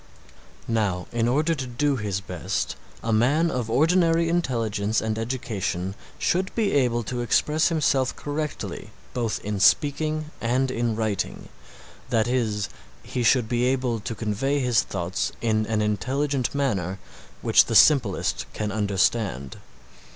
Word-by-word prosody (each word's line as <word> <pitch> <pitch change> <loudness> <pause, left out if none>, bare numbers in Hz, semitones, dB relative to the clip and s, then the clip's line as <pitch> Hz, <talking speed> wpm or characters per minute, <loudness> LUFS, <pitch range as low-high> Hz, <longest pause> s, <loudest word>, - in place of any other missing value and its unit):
Now 105 -6 0
in 120 0 0
order 150 +7 +2
to 135 -5 -4
do 140 +4 0
his 105 -4 -2
best - - -3 0.3
a 115 - 0
man 145 +10 +3
of 120 -3 -2
ordinary 165 +4 +3
intelligence 115 -10 0
and 110 -1 -2
education 105 -6 -3 0.2
should 185 +2 0
be 220 -3 +1
able 120 -4 +2
to 120 +3 -3
express 150 +7 +2
himself 135 -5 +1
correctly 150 0 -4 0.2
both 115 -3 -1
in 105 -1 -2
speaking 155 +7 +2
and 120 -2 0
writing, 110 -3 -2 0.6
that 110 0 +2
is, 110 -5 0 0.4
he 125 - -3
should 120 0 +3
be 120 +1 +1
able 125 -3 0
to 115 +2 -5
convey 115 +7 -1
his 125 -3 +3
thoughts 90 -1 -3
in 110 -2 0
an 110 -1 0
intelligent 130 +6 -1
manner 95 -10 -1 0.5
which - - +6
the 115 - -2
simplest 105 - +4
can 105 -1 -3
understand. 100 - 0
120 Hz, 135 wpm, -25 LUFS, 105-140 Hz, 0.6 s, which